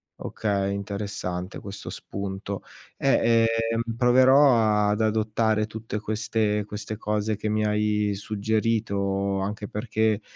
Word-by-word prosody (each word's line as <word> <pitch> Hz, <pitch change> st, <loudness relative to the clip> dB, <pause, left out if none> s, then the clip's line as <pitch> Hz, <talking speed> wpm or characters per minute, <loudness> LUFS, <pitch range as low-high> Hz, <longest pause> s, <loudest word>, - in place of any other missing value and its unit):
Okay, 100 Hz, -2 st, -2 dB
interessante 100 Hz, -2 st, -4 dB
questo 100 Hz, 0 st, -8 dB
spunto. 100 Hz, 0 st, -5 dB, 0.4 s
Eh, 115 Hz, -4 st, +3 dB, 0.3 s
ehm, 115 Hz, -, 0 dB, 0.2 s
proverò 125 Hz, -4 st, +5 dB
ad 105 Hz, +2 st, 0 dB
adottare 110 Hz, 0 st, +1 dB
tutte 110 Hz, -1 st, -5 dB
queste 105 Hz, 0 st, 0 dB
queste 105 Hz, 0 st, -6 dB
cose 105 Hz, 0 st, -1 dB
che 105 Hz, +1 st, -3 dB
mi 105 Hz, 0 st, +1 dB
hai 105 Hz, -1 st, +1 dB
suggerito. 100 Hz, -2 st, -1 dB
Anche 105 Hz, +1 st, -3 dB
perché, 110 Hz, -1 st, 0 dB
105 Hz, 110 wpm, -25 LUFS, 100-110 Hz, 0.4 s, proverò